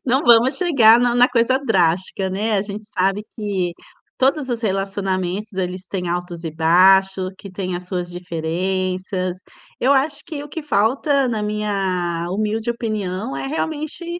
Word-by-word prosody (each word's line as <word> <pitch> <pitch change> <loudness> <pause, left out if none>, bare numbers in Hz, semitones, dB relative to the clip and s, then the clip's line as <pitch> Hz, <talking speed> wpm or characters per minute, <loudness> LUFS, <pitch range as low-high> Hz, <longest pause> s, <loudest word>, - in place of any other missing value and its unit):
Não 260 +3 +2
vamos 240 +3 +6
chegar 245 -11 +5
na 245 0 +2
na 245 +1 +5
coisa 245 +2 +2
drástica, 190 -2 +1
né? 210 +4 -1
A 195 - +1
gente 210 +1 -7
sabe 195 +2 +1
que 195 -5 -2 0.5
todos 270 +1 +1
os 235 -1 -2
relacionamentos, 195 -1 -2
eles 185 0 -3
têm 180 -3 -3
altos 175 -1 -4
e 165 - -3
baixos, 185 +3 +4
que 200 - -10
têm 185 -1 -4
as 180 0 -9
suas 180 -2 -3
diferenças. 185 +2 -2 0.4
Eu 260 +3 +4
acho 280 +2 +2
que 305 -4 -6
o 295 - -9
que 320 +1 -6
falta, 270 +3 +2
na 220 -3 -2
minha 190 -5 -1
humilde 215 +4 -1
opinião 215 -1 -3
é - - -4
realmente 310 +3 -3
200 Hz, 155 wpm, -20 LUFS, 185-240 Hz, 0.5 s, vamos